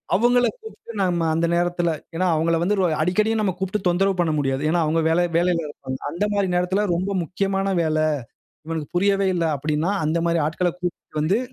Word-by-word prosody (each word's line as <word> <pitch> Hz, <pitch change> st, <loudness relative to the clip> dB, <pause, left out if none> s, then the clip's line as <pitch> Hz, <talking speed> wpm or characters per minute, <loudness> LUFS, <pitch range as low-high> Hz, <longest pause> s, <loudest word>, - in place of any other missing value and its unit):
அவுங்கள 245 Hz, +2 st, +4 dB
கூப்ட்டு 445 Hz, -, -11 dB
நம்ம 175 Hz, -3 st, +1 dB
அந்த 165 Hz, +1 st, +1 dB
நேரத்தில 175 Hz, 0 st, +1 dB, 0.3 s
ஏனா 185 Hz, +3 st, +1 dB
அவுங்கள 165 Hz, +1 st, +1 dB
வந்து 200 Hz, +4 st, +2 dB
ஒரு 185 Hz, -, +3 dB
அடிக்கடியும் 215 Hz, +6 st, +1 dB
நம்ம 195 Hz, -3 st, 0 dB
கூப்பிட்டு 190 Hz, +1 st, -2 dB
தொந்தரவு 195 Hz, +2 st, +2 dB
பண்ண 165 Hz, -, +1 dB
முடியாது. 135 Hz, -1 st, -1 dB
ஏனா 170 Hz, +1 st, +2 dB
அவுங்க 165 Hz, +2 st, +1 dB
வேலை 175 Hz, +2 st, +3 dB
வேலையில 170 Hz, -2 st, +1 dB
இருப்பாங்க. 130 Hz, -3 st, -7 dB
அந்த 175 Hz, +7 st, -1 dB
மாரி 200 Hz, -2 st, +1 dB
நேரத்தில 185 Hz, +4 st, +1 dB
ரொம்ப 185 Hz, +3 st, -1 dB
முக்கியமான 195 Hz, +3 st, -1 dB
வேல. 155 Hz, -1 st, 0 dB, 0.7 s
இவனுக்கு 160 Hz, -2 st, -4 dB
புரியவே 195 Hz, +1 st, +2 dB
இல்ல 170 Hz, -1 st, 0 dB
அப்பிடின்னா 150 Hz, +5 st, -1 dB
அந்தமாரி 170 Hz, +2 st, +1 dB
ஆட்கள 175 Hz, +2 st, 0 dB
கூப்பிட்டு 175 Hz, -3 st, -4 dB
வந்து 185 Hz, +8 st, +2 dB
175 Hz, 175 wpm, -22 LUFS, 165-195 Hz, 0.7 s, அவுங்கள